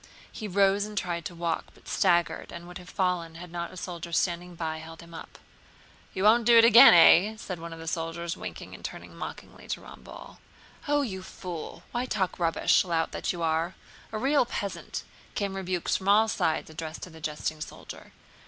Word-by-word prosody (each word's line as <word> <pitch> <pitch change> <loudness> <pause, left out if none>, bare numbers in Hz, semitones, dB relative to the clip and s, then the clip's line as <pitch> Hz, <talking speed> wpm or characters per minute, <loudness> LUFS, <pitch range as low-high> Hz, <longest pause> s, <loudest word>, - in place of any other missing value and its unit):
He 215 - -6
rose 200 +1 +3
and 210 0 -9
tried 175 -3 -2
to 175 - -6
walk, 170 -1 -2
but - - -20
staggered 175 -3 +1
and 170 0 -9
would 180 +1 -9
have 180 0 -13
fallen 180 -3 -1
had 170 0 -9
not 170 0 -4
a 185 - -11
soldier 170 -2 -6
standing 175 +1 -1
by 160 -1 -3
held 165 +1 -10
him 170 0 -14
up. 165 - -10 0.8
"You 190 - -1
won't 225 +2 +5
do 235 -1 +8
it 230 - +9
again, 230 -5 +10
eh?" 190 +5 +7
said 185 -5 -6
one 170 0 -7
of 165 - -8
the 165 0 -9
soldiers, 165 +1 -3
winking - - -8
and - - -11
turning - - -8
mockingly - - -9
to - - -3
Ramballe. - - -12 0.5
"Oh, 290 0 +2
you 190 -7 -4
fool! 180 -3 -7
Why 245 +1 -1
talk 190 -6 -1
rubbish, 165 -1 +3
lout 165 -3 -1
that - - -2
you 175 -2 -4
are—a 165 +6 -3
real 270 +3 +3
peasant!" 200 -4 -4 0.3
came 200 -2 -2
rebukes 185 -2 -1
from 190 - -3
all 215 +2 +6
sides 160 -7 -1
addressed 160 0 -6
to 180 - -8
the 160 0 -13
jesting 155 0 -3
soldier. - - -9
175 Hz, 195 wpm, -28 LUFS, 165-200 Hz, 0.8 s, again